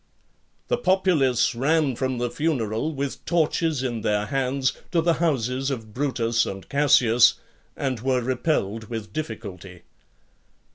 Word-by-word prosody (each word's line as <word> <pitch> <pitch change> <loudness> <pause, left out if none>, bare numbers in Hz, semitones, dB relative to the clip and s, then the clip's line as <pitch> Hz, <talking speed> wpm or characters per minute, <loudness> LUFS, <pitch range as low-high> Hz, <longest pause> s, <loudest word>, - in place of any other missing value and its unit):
LXXXV. - - -42
The - - +2
populace 175 - +2
ran 140 +2 +1
from 130 0 -2
the 120 0 -2
funeral, 140 -3 -1
with 140 0 -4
torches 160 -3 0
in 120 -3 -2
their 105 0 0
hands, 135 +1 0 0.2
to 170 - +2
the 170 +1 +3
houses 135 -4 0
of 115 -6 -5
Brutus 120 -4 0
and 95 -1 -7
Cassius, 125 -5 +4 0.4
and 130 -4 -2
were 130 +1 0
repelled 120 -4 -1
with 110 -2 -6
difficulty. 100 - -7
130 Hz, 135 wpm, -24 LUFS, 115-145 Hz, 0.4 s, Cassius